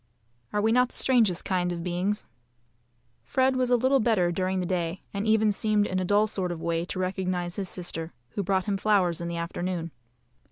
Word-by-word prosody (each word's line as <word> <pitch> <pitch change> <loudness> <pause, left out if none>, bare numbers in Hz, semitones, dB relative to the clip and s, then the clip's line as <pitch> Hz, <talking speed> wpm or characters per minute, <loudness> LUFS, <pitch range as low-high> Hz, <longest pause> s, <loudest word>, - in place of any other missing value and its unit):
Are 210 - 0
we 220 - +3
not 250 +1 +4
the - - -13
strangest 225 -9 +3
kind 180 -2 0
of 170 -1 -4
beings? 180 +4 -1 1.0
Fred 260 - +2
was 255 -1 +1
a 250 - +5
little 260 +3 +3
better 215 -7 +2
during 185 +2 -1
the 180 - -1
day, 175 0 -2
and 200 +2 -2
even 220 -1 +4
seemed 210 0 +1
in 185 -2 -1
a - - 0
dull 205 +3 +4
sort 190 -4 -2
of 170 - -5
way 165 0 -1
to 185 - -6
recognise 185 -1 -2
his 195 -3 -3
sister, 165 -2 -5 0.2
who 200 - -3
brought 190 -1 0
him 200 -2 0
flowers 190 -5 +2
in 170 - -3
the 170 0 -3
afternoon. 170 0 -3
185 Hz, 205 wpm, -27 LUFS, 175-215 Hz, 1.0 s, a